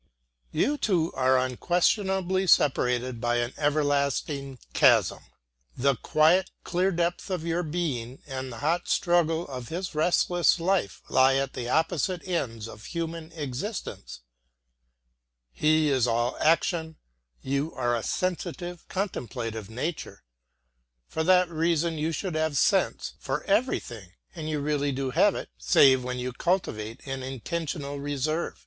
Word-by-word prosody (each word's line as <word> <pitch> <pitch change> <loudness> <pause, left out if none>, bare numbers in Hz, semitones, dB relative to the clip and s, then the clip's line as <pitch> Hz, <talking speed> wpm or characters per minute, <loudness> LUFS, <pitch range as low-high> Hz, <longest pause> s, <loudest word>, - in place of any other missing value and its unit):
You 295 +1 +1
two 175 -9 +1
are 130 0 +3
unquestionably 185 - +1
separated 125 -5 +2
by 120 0 +1
an 120 +1 -1
everlasting 140 -2 0 0.2
chasm. - - +4 0.6
The 140 +1 +3
quiet, 165 +8 +3
clear 180 +2 +1
depth 175 +2 -1
of 180 -4 -2
your 170 +1 0
being 150 -7 -3
and 130 -2 -5
the 115 - -8
hot 170 +3 +1
struggle 170 -2 +2
of 125 -3 -7
his 180 +5 -4
restless 175 +2 +3
life 170 - 0
lie 130 +1 +4
at 135 0 -1
the 120 -1 -4
opposite 165 +4 0
ends 115 -11 -2
of 105 -1 -11
human 165 -1 -5
existence. 150 - -5 1.3
He 155 - +3
is 130 -3 +2
all 120 +2 0
action, 160 0 +1 0.5
you 140 +4 -1
are 120 -1 +1
a 115 - -2
sensitive, 175 +1 -3
contemplative 115 - -4
nature. 125 - -5 0.8
For 160 - -2
that 180 0 +5
reason 165 0 0
you 160 +2 0
should 180 +2 -3
have 155 -2 0
sense - - +1
for 135 +3 -3
everything, 120 - -1 0.2
and 155 -2 -5
you 150 -2 -1
really 145 -1 0
do 135 0 -2
have 180 +8 +4
it, - - -6
save 130 -2 +5
when 125 0 -3
you 125 0 -3
cultivate 115 - -2
an 135 -1 -4
intentional 140 +2 -4
reserve. 145 +3 -2
155 Hz, 135 wpm, -27 LUFS, 130-175 Hz, 1.3 s, that